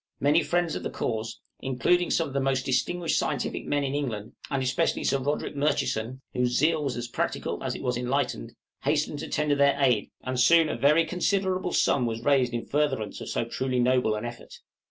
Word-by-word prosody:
Many 150 Hz, +4 st, +4 dB
friends 175 Hz, -2 st, 0 dB
of -, -, -3 dB
the -, -, -3 dB
cause 115 Hz, -1 st, -3 dB, 0.2 s
including 135 Hz, +8 st, +1 dB
some 165 Hz, -, +2 dB
of 135 Hz, -, -9 dB
the 140 Hz, -, +1 dB
most 135 Hz, -1 st, 0 dB
distinguished 165 Hz, +6 st, 0 dB
scientific -, -, -2 dB
men 145 Hz, 0 st, +1 dB
in 135 Hz, 0 st, -2 dB
England, 115 Hz, -7 st, -3 dB, 0.2 s
and 135 Hz, -1 st, -1 dB
especially 130 Hz, +1 st, 0 dB
Sir 135 Hz, -, +1 dB
Roderick 145 Hz, +2 st, -2 dB
Murchison, 130 Hz, -4 st, -1 dB
whose 125 Hz, -1 st, +1 dB
zeal 155 Hz, +1 st, +2 dB
was 135 Hz, -4 st, -2 dB
as 120 Hz, 0 st, -4 dB
practical 120 Hz, -, -3 dB
as -, -, -2 dB
it -, -, -7 dB
was 125 Hz, -1 st, 0 dB
enlightened 125 Hz, +3 st, -2 dB, 0.3 s
hastened -, -, 0 dB
to -, -, -5 dB
tender 150 Hz, -1 st, +1 dB
their 140 Hz, 0 st, +3 dB
aid, 125 Hz, -6 st, +2 dB
and 130 Hz, -1 st, -2 dB
soon 165 Hz, +5 st, +5 dB
a -, -, -2 dB
very 150 Hz, +7 st, +4 dB
considerable 185 Hz, +1 st, 0 dB
sum 125 Hz, -6 st, +2 dB
was 115 Hz, 0 st, -4 dB
raised 135 Hz, -3 st, +3 dB
in 120 Hz, -1 st, -3 dB
furtherance 140 Hz, -7 st, -1 dB
of -, -, -6 dB
so -, -, -1 dB
truly 130 Hz, +2 st, -2 dB
noble 125 Hz, -3 st, +2 dB
an 105 Hz, +2 st, -4 dB
effort. 120 Hz, 0 st, -9 dB
135 Hz, 200 wpm, -27 LUFS, 125-150 Hz, 0.3 s, soon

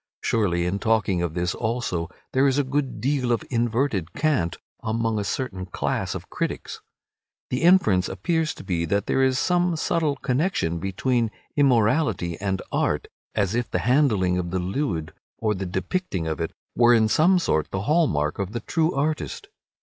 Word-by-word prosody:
Surely 90 Hz, -6 st, +1 dB
in 95 Hz, +3 st, -1 dB
talking 105 Hz, -5 st, +1 dB
of 85 Hz, -2 st, -2 dB
this 90 Hz, 0 st, 0 dB
also 110 Hz, -8 st, -2 dB, 0.2 s
there 135 Hz, +2 st, +4 dB
is 135 Hz, 0 st, +2 dB
a 145 Hz, -, +3 dB
good 135 Hz, -3 st, -2 dB
deal 130 Hz, +1 st, 0 dB
of 115 Hz, -, +1 dB
inverted 115 Hz, -, 0 dB
cant 140 Hz, -, 0 dB, 0.2 s
among 110 Hz, -1 st, 0 dB
a -, -, -1 dB
certain 100 Hz, -4 st, -3 dB
class 90 Hz, -, -2 dB
of -, -, -7 dB
critics. -, -, -4 dB, 0.7 s
The 125 Hz, -, 0 dB
inference 165 Hz, -, +4 dB
appears 160 Hz, -, -1 dB
to -, -, -10 dB
be 85 Hz, -3 st, -1 dB
that 100 Hz, +4 st, 0 dB
there 135 Hz, -, +1 dB
is 130 Hz, -1 st, +3 dB
some 175 Hz, +2 st, +2 dB
subtle 155 Hz, -2 st, 0 dB
connection 130 Hz, -, 0 dB
between 115 Hz, +6 st, 0 dB, 0.3 s
immorality 125 Hz, -, +2 dB
and 95 Hz, -1 st, -1 dB
art, -, -, 0 dB, 0.3 s
as 100 Hz, -2 st, +1 dB
if 120 Hz, 0 st, -1 dB
the -, -, 0 dB
handling 110 Hz, -9 st, +3 dB
of 85 Hz, -1 st, -3 dB
the 95 Hz, -, -1 dB
lewd, 90 Hz, -, -2 dB, 0.2 s
or 110 Hz, -2 st, 0 dB
the 95 Hz, -1 st, -4 dB
depicting 95 Hz, -, -2 dB
of 80 Hz, +1 st, -2 dB
it, 80 Hz, -, -1 dB, 0.3 s
were 120 Hz, 0 st, +6 dB
in 110 Hz, -1 st, +4 dB
some 175 Hz, +11 st, +4 dB
sort 80 Hz, -, 0 dB
the 95 Hz, -, -3 dB
hallmark 100 Hz, -, +1 dB
of 100 Hz, +1 st, -3 dB
the 120 Hz, -, -2 dB
true 165 Hz, +7 st, 0 dB
artist. 155 Hz, -, -2 dB
115 Hz, 175 wpm, -24 LUFS, 95-140 Hz, 0.7 s, were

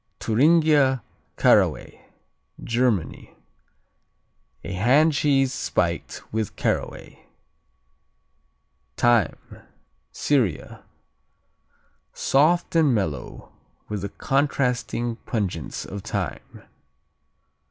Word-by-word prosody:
Thuringia 140 Hz, 0 st, +3 dB, 0.3 s
Caraway -, -, +2 dB, 0.6 s
Germany 115 Hz, -, -1 dB, 1.3 s
A -, -, -6 dB
hand 135 Hz, -, +3 dB
cheese 135 Hz, -2 st, +2 dB
spiked -, -, -2 dB
with 110 Hz, -2 st, -2 dB
caraway. -, -, -4 dB, 1.7 s
Thyme 120 Hz, -9 st, +1 dB, 0.5 s
Syria 125 Hz, -, -1 dB, 1.3 s
Soft 165 Hz, +6 st, +2 dB
and 150 Hz, -6 st, +4 dB
mellow, 80 Hz, -, -4 dB, 0.4 s
with 105 Hz, -2 st, -4 dB
the 100 Hz, -, -4 dB
contrasting 125 Hz, -3 st, -1 dB
pungence 95 Hz, -, -3 dB
of 100 Hz, +1 st, -7 dB
thyme. -, -, -5 dB
125 Hz, 70 wpm, -23 LUFS, 105-140 Hz, 1.7 s, and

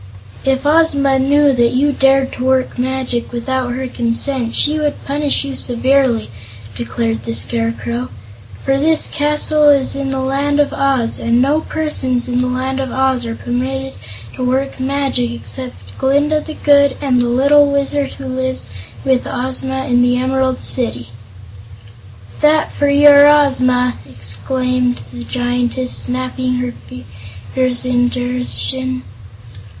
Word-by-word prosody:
"If 270 Hz, +1 st, 0 dB
Ozma 285 Hz, -3 st, +3 dB
knew 285 Hz, +1 st, +3 dB
that 240 Hz, -1 st, +2 dB
you 285 Hz, +3 st, +2 dB
dared 270 Hz, -1 st, +2 dB
to 250 Hz, -, -5 dB
work 260 Hz, -1 st, 0 dB
magic 255 Hz, -1 st, -2 dB
without 245 Hz, +1 st, -2 dB
her 260 Hz, +2 st, -4 dB
consent, 240 Hz, +1 st, -2 dB
she 305 Hz, +1 st, +2 dB
would 295 Hz, -1 st, -3 dB
punish 285 Hz, +1 st, +1 dB
you 275 Hz, -1 st, -5 dB
severely," 250 Hz, -, +1 dB, 0.4 s
declared 115 Hz, 0 st, -3 dB
the 115 Hz, 0 st, -4 dB
Scarecrow, 115 Hz, +2 st, -2 dB, 0.6 s
"for 270 Hz, 0 st, +1 dB
this 315 Hz, +2 st, +3 dB
castle 300 Hz, 0 st, +2 dB
is 280 Hz, -2 st, +3 dB
in 275 Hz, 0 st, -3 dB
the 270 Hz, 0 st, -2 dB
Land 280 Hz, +2 st, 0 dB
of 290 Hz, -, +1 dB
Oz, 270 Hz, -4 st, 0 dB
and 235 Hz, +1 st, +1 dB
no 285 Hz, +5 st, +2 dB
persons 265 Hz, -7 st, -1 dB
in 245 Hz, 0 st, -1 dB
the 255 Hz, -, +1 dB
Land 260 Hz, +1 st, -2 dB
of 265 Hz, -2 st, -3 dB
Oz 260 Hz, -2 st, 0 dB
are 230 Hz, -, -4 dB
permitted 265 Hz, +3 st, -3 dB, 0.4 s
to 255 Hz, -, -5 dB
work 265 Hz, +2 st, -1 dB
magic 270 Hz, -, -1 dB
except 105 Hz, -3 st, -7 dB
Glinda 290 Hz, +3 st, +2 dB
the 310 Hz, 0 st, -8 dB
Good 285 Hz, -2 st, +3 dB
and 260 Hz, -3 st, +1 dB
the 245 Hz, -, 0 dB
little 280 Hz, +4 st, +4 dB
Wizard 280 Hz, 0 st, -1 dB
who 275 Hz, -, -10 dB
lives 260 Hz, -, -2 dB, 0.4 s
with 260 Hz, -2 st, +1 dB
Ozma 265 Hz, +1 st, -3 dB
in 245 Hz, -1 st, +2 dB
the 245 Hz, 0 st, +2 dB
Emerald 260 Hz, 0 st, 0 dB
City." 120 Hz, -, -2 dB, 1.3 s
"That 305 Hz, +1 st, +3 dB
for 285 Hz, -, +1 dB
your 285 Hz, 0 st, +7 dB
Ozma!" 255 Hz, -4 st, +3 dB
exclaimed 250 Hz, -, -2 dB
the 120 Hz, -1 st, -7 dB
Giantess, 245 Hz, -, -1 dB
snapping 255 Hz, 0 st, -2 dB
her 250 Hz, 0 st, -2 dB, 0.2 s
fingers 115 Hz, -, -5 dB
in 245 Hz, -1 st, +2 dB
derision. 255 Hz, +1 st, -2 dB
260 Hz, 140 wpm, -16 LUFS, 245-275 Hz, 1.3 s, your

